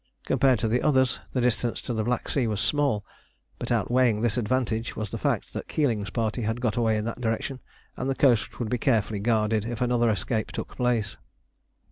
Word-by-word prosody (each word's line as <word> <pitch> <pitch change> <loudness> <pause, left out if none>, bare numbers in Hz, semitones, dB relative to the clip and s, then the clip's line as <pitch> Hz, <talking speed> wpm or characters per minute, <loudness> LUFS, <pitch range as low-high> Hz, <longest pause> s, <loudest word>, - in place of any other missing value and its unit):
Compared 130 -3 +3
to 110 - -1
the 120 +3 +1
others 130 -3 +2
the 125 - 0
distance 120 -1 0
to 125 - -4
the 110 -1 0
Black 120 +2 -1
Sea 130 -5 0
was 105 -2 -1
small, 125 -2 +1 0.5
but - - -4
outweighing 120 -4 +2
this 115 -2 +1
advantage 115 -1 -1
was 110 -2 -4
the - - -4
fact - - -1
that - - -5
Keeling's 115 -9 0
party 115 0 -1
had 110 +2 -1
got 120 -3 0
away 115 -2 +2
in 105 - -2
that 115 +1 -4
direction, 120 +3 -2 0.4
and 130 - -3
the 135 - 0
coast 125 -6 +2
would 115 -3 -3
be 125 - 0
carefully 110 -4 +1
guarded 110 -1 +1
if 115 0 -4
another 120 -1 +2
escape 110 +2 -1
took - - -6
place. 120 -5 0
115 Hz, 200 wpm, -26 LUFS, 110-125 Hz, 0.5 s, Compared